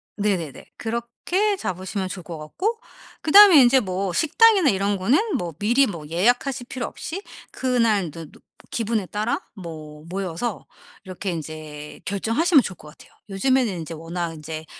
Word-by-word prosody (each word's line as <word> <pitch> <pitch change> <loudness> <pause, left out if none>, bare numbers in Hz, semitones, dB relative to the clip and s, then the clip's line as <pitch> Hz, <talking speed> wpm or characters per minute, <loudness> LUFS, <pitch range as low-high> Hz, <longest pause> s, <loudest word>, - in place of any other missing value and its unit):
네네네. 190 -8 -2
그렇게 235 - -1
잡으시면 185 - -3
좋을 185 -1 -7
것 165 -1 -7
같고 375 - -3 0.4
그다음에 370 -1 +9
인제 255 +1 +5
뭐 190 -2 -2
식당이나 380 - +4
이런 200 -1 0
거는 295 - +1
뭐 175 -2 -4
미리 240 +7 +4
뭐 170 - -6
예약하실 245 - +1
필요 255 -3 -3
없이 365 +5 -6 0.3
그날 230 -8 +1
저 165 +2 -8
노 - - -17 0.3
기분에 225 -3 -1
따라 210 +5 -2
뭐 155 -6 -9
모여서 190 +4 -4 0.4
이렇게 190 +1 -5
인제 155 -2 -7
결정하시면 240 - +3
좋을 185 - -5
것 150 - -14
같아요. - - -17 0.2
요즘에는 255 +6 +2
인제 165 0 -6
워낙 165 +1 -4
인제 155 0 -7
200 Hz, 330 characters per minute, -23 LUFS, 170-255 Hz, 0.4 s, 그다음에